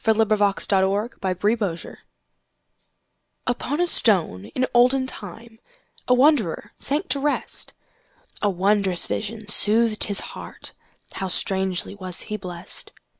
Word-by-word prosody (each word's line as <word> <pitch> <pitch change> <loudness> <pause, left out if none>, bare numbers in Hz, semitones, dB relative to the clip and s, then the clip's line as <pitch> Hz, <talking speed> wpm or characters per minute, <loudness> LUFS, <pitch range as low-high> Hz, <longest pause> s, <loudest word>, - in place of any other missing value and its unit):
Isaacs 215 -2 +2
Pillow 195 0 +2 0.2
and 195 -1 -1
Stone - - -10 1.5
UPON 250 +4 -2
a 355 - +3
stone 175 - +3
in 255 - -2
olden 255 +2 +4
timeA 225 0 -9 0.5
wanderer 250 - +2
sank 300 +7 0
to 280 - +2
rest.A 280 -6 -5
wondrous 195 -1 +2
vision 215 0 -4
soothed 215 +1 +4
his 200 -2 -1
heartHow 190 - -9
strangely 190 0 0
was 185 -3 -2
he 215 - -5
blessed! 180 -4 -6
210 Hz, 105 wpm, -23 LUFS, 190-235 Hz, 1.5 s, olden